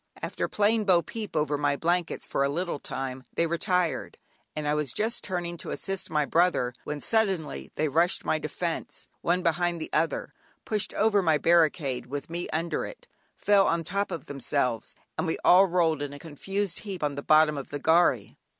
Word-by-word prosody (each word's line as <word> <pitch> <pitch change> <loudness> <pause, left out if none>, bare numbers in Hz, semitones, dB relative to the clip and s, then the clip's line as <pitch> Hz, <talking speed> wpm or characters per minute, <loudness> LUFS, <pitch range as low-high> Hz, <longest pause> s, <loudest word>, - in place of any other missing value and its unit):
After - - -2
playing 210 +1 +2
"bo 180 -3 +4
peep" 215 +6 -6
over 150 -1 0
my 145 -1 +2
blankets 170 +3 -1
for 140 - 0
a 140 - +1
little 170 +1 -2
time, 130 -1 -5
they 170 - +2
retired, 170 +1 0 0.4
and 150 -1 -3
I 145 - +2
was 150 -4 -1
just 225 +2 0
turning 175 -2 -3
to - - -7
assist 195 -1 -4
my 150 -2 +1
brother, 165 -7 +2
when 150 -1 -4
suddenly, 190 - 0
they 155 - +1
rushed 165 +5 +2
my 155 - +1
defence, 165 +2 -4
one 180 +1 +1
behind 175 0 +1
the 155 - -6
other, 160 +2 0 0.3
pushed 210 -3 0
over 210 -1 +3
my 160 -4 +3
barricade 155 -6 +2
with 145 +4 -6
me 175 +1 -4
under 165 +2 -1
it, - - -9 0.3
fell 200 -1 +4
on 170 0 +1
the - - -11
top 200 +4 -1
themselves, 140 -7 -2 0.2
and - - 0
we 160 - -1
all 190 +2 +7
rolled 165 -4 +1
a 145 0 -5
confused 190 +6 -3
heap 195 -6 -6
on 145 -1 0
the 140 - -5
bottom 155 +1 +5
of 140 -2 -6
the 145 - -4
gharry. 165 +4 +2
165 Hz, 185 wpm, -27 LUFS, 145-180 Hz, 0.4 s, all